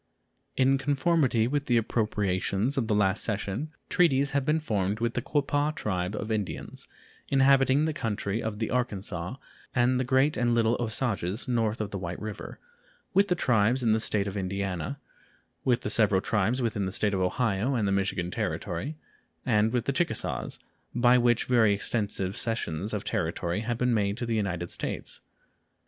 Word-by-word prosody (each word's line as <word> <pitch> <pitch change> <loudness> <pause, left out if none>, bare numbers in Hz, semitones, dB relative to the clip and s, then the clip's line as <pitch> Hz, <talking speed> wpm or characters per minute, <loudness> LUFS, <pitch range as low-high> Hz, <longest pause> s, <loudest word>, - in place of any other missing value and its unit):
In 135 +1 +4
conformity 140 -4 +2
with 145 +2 -1
the 120 - +3
appropriations 105 +1 0
of 125 -5 0
the 105 - +2
last 100 -1 +2
session, 110 +6 -2 0.2
treaties 140 -5 +3
have 140 -1 +1
been 150 +3 +2
formed 105 -7 -1
with 115 0 0
the 125 - -1
Quapaw 145 +2 0
tribe 90 -1 -2
of 105 +1 -4
Indians, 105 -3 -4 0.4
inhabiting 135 +1 +4
the 160 - -1
country 110 -4 -2
on 110 -1 -3
the 110 0 -2
Arkansaw, 100 -4 -1 0.4
and 125 +1 +3
the - - +1
Great 130 +4 +2
and 120 -1 +2
Little 115 0 +3
Osages 110 -3 -1
north 115 -3 0
of 105 -2 -3
the 100 - -4
White 90 -1 -5
River; 105 -1 -7 0.6
with 200 +2 +4
the 180 - +2
tribes 125 -3 +2
in 115 - +3
the 110 - +2
State 105 -2 +1
of 100 0 -4
Indiana; 100 +6 -3 0.6
with 125 -2 +2
the - - -3
several 105 -5 +4
tribes 110 +6 0
within 105 -4 -1
the - - -3
State 105 +2 +1
of 95 - 0
Ohio 110 +5 0
and 110 -4 +1
the - - +1
Michigan 95 -3 -1
Territory, 150 +10 -3 0.5
and 110 -3 +3
with 120 -1 0
the 140 - 0
Chickasaws, 170 +4 -1 0.4
by 120 +1 +5
which 120 -1 +2
very 110 -5 +4
extensive 100 -2 -1
cessions 105 -4 -2
of 100 - -3
territory 85 +2 -1
have 115 +1 -2
been 125 0 +1
made 100 -1 0
to 125 - -3
the 115 -1 -1
United 90 -5 -2
States. - - -4
115 Hz, 175 wpm, -28 LUFS, 100-130 Hz, 0.6 s, by